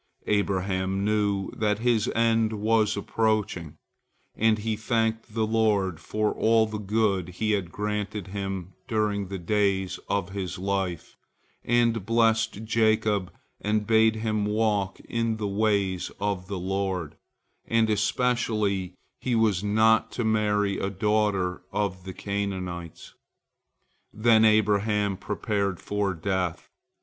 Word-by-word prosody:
Abraham 95 -1 0
knew 105 -2 0
that 105 -1 +1
his 115 -1 +1
end 115 -1 +2
was 110 0 +1
approaching, 105 -6 -1 0.6
and 110 0 +3
he 110 +1 -2
thanked 110 0 -1
the 110 -1 +2
Lord 105 -6 +1
for 105 +5 -1
all 110 0 +3
the 110 -1 -5
good 100 -3 0
He 110 +4 -1
had 95 -5 -1
granted 105 -1 -3
him 95 -2 -4
during 105 -4 0
the 95 +1 -5
days 95 0 0
of 100 -2 0
his 95 -2 -4
life, 95 -3 -3 0.5
and 115 -2 +2
blessed 115 -1 +1
Jacob 110 -4 +1 0.3
and 105 0 0
bade 110 0 +4
him 110 -1 -1
walk 105 -2 0
in 115 -1 -1
the 105 -2 -2
ways 100 -3 0
of 100 -2 -2
the 100 - -4
Lord, 95 -3 -2 0.5
and 115 -1 +3
especially 105 -4 0 0.2
he 125 -2 -1
was 105 -4 +2
not 110 +2 +3
to 120 - -2
marry 105 -2 +1
a 95 - -1
daughter 100 -2 0
of 95 -3 -2
the 95 - -6
Canaanites. 95 -5 -5 1.0
Then 110 0 +4
Abraham 105 -1 +2
prepared 100 -1 -2
for 100 -2 -1
death. 90 0 -2
105 Hz, 125 wpm, -26 LUFS, 95-110 Hz, 1.0 s, bade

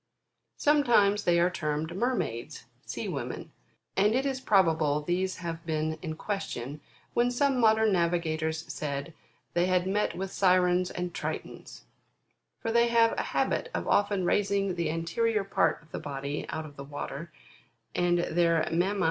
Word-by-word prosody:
Sometimes 235 -9 +3
they 170 -1 +4
are 175 +1 +3
termed 155 0 -2
Mermaids, 185 - -2 0.2
Sea - - -4
women, - - -5 0.4
and 210 +3 +3
it 265 +2 +1
is 265 -2 -1
probable 160 - +3
these 185 +3 0
have 170 -2 -5
been 155 -1 -2
in 160 -3 -4
question, 150 - -4 0.3
when 240 +1 +3
some 260 +1 +1
modern 220 -1 +4
navigators 160 -2 0
said, 140 +1 -4 0.4
they 175 +1 +2
had 180 -1 +2
met 205 +2 0
with 190 +1 -4
Sirens 180 -1 +3
and 180 -1 -4
Tritons: - - -6 0.8
for 225 - -2
they 235 +1 +4
have 230 -1 +4
a - - -1
habit 485 - -1
of - - -2
often 200 -2 +2
raising 200 0 +1
the 170 -3 -1
anterior 195 +7 0
part 195 - +1
of 155 - -24
the - - -4
body 140 +1 -4
out 160 - -4
of 145 -2 -12
the 140 - -6
water, 145 +3 -6 0.6
and 175 0 +2
their 170 -1 +2
mamma? 185 +5 +1
175 Hz, 155 wpm, -29 LUFS, 160-205 Hz, 0.8 s, they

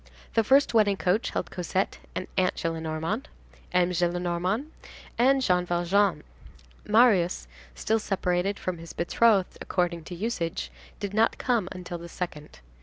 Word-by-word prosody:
The 225 - +3
first 270 +3 +4
wedding 205 -3 +4
coach 190 +6 +1
held 170 - -3
Cosette 185 +2 -2 0.2
and 185 - -2
Aunt 185 -1 +2
Gillenormand, 165 - -2 0.5
M. 180 0 +3
Gillenormand 175 - 0 0.5
and 265 +2 +4
Jean 180 -5 +3
Valjean. 175 +3 +1 0.6
Marius, 210 -6 +4 0.3
still 225 +1 +1
separated 195 -1 0
from 180 -2 -4
his 165 0 -9
betrothed 195 +2 +2
according 175 -2 -1
to 175 - -7
usage, 185 -3 -3 0.3
did 200 -1 -4
not 220 +2 +3
come 230 -7 0
until 180 -2 -6
the 170 0 -9
second. 150 - -7
185 Hz, 135 wpm, -27 LUFS, 175-215 Hz, 0.6 s, first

